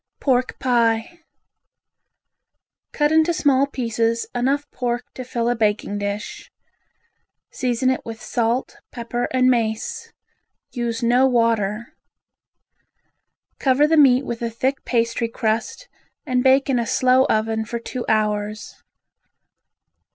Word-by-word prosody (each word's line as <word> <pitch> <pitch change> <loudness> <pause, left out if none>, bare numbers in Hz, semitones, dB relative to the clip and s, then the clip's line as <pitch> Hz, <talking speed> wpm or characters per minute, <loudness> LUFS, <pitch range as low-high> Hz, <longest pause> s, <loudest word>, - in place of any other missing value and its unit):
Pork 255 -2 0
Pie 235 +4 0 1.7
Cut 295 0 +1
into 320 +2 +3
small 275 -2 +3
pieces 230 -3 -1
enough 270 +4 0
pork 245 -1 -2
to 255 - -7
fill 240 -2 -2
a 245 - +1
baking 210 -2 -1
dish. 205 +1 -5 1.0
Season 255 0 0
it 260 - -3
with 225 -1 -8
salt, 240 +1 -2
pepper 240 0 -3
and 255 -1 +3
mace. 245 - -1 0.6
Use 235 -2 -3
no 245 +3 +4
water. 230 -3 0 1.6
Cover 270 +2 +3
the 320 +2 +2
meat 270 -3 +5
with 235 -2 -5
a 235 - -1
thick 260 +4 -2
pastry 235 -1 0
crust 225 - -2 0.4
and 250 -1 0
bake 270 +1 +4
in 260 -3 +1
a 235 - -2
slow 255 +1 +3
oven 220 0 0
for 235 +2 -5
two 240 +1 -6
hours. 210 -1 -1
240 Hz, 120 wpm, -21 LUFS, 225-260 Hz, 1.7 s, meat